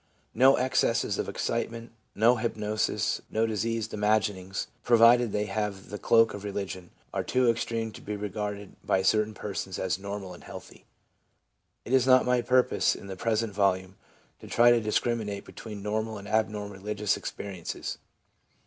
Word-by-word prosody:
No 135 +2 +6
ex 130 +1 +2
cesses - - 0
of - - -2
excitement, 115 0 -3 0.2
no 120 +4 +4
hypnosis, 110 -1 -1
no 110 +1 +1
diseased 115 +1 -2
imagin 105 0 +2
ings, 95 +1 -5 0.2
provided 120 0 +5
they 105 +1 0
have 105 -3 -4
the 105 - -5
cloak 115 -1 +4
of 100 - -7
religion, 95 -3 -5 0.2
are - - -1
too 125 -1 +1
extreme 115 -1 -3
to - - -11
be 105 - -4
regarded 105 -1 -5
by 95 - +1
certain 105 +2 +2
persons 95 -2 -5
as 95 0 -1
normal 100 -1 -6
and 85 - -13
healthy. - - -11 1.0
It 125 - -3
is 130 -1 +4
not 130 0 +6
my 125 -1 +2
purpose, 125 +1 +2
in - - -10
the 95 -1 -6
present 110 +1 -1
volume, 95 -2 +1 0.4
to - - -11
try 120 0 +5
to 120 -1 +4
discriminate 110 -2 -1
between 105 -3 -9
normal 110 +1 -2
and 100 0 -9
abnormal 105 -1 -1
religious 105 +1 -1
experiences. 95 -4 -6
105 Hz, 160 wpm, -28 LUFS, 100-115 Hz, 1.0 s, No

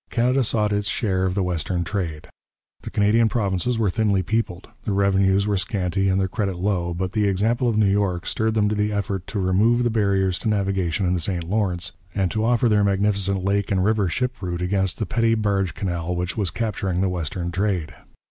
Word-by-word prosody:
Canada 125 +3 +2
sought 105 -2 +1
its 105 0 0
share 95 -5 0
of 90 - -2
the 100 - +1
western 90 0 -1
trade. 85 -4 -4 0.5
The - - -7
Canadian 110 +2 +3
provinces 110 +1 0
were 110 -4 +1
thinly 100 -2 +1
peopled, 95 -3 -2 0.2
their 100 - -1
revenues 100 0 +3
were 105 -1 +1
scanty 95 -1 -1
and 95 0 +2
their 95 - +1
credit 95 -1 -2
low, 90 -2 -1
but 90 +1 -2
the 105 0 +1
example 115 +6 +1
of 110 - 0
New 110 - +4
York 95 -3 +1
stirred 110 0 0
them 105 -1 +3
to - - 0
the 105 0 0
effort 100 -2 -3
to 105 - -3
remove 105 +6 +3
the 120 - +1
barriers 95 -5 +1
to - - -1
navigation 95 -3 0
in 90 - +1
the 90 - 0
St 85 +1 -2
Lawrence, 90 -1 -1 0.2
and 95 -3 0
to 110 - -1
offer 120 +1 +3
their 105 -2 +3
magnificent 100 -1 +1
lake 100 0 0
and 95 -1 +2
river 105 -3 +2
ship 125 +6 -2
route 90 -1 -3
against 95 0 0
the 110 - -2
petty 115 -1 +1
barge 100 -4 0
canal 90 -2 -2
which 90 +1 -3
was 100 -5 0
capturing 95 -5 -2
the 95 - +2
western 85 0 -3
trade. 95 -4 -1
100 Hz, 210 wpm, -23 LUFS, 90-105 Hz, 0.5 s, New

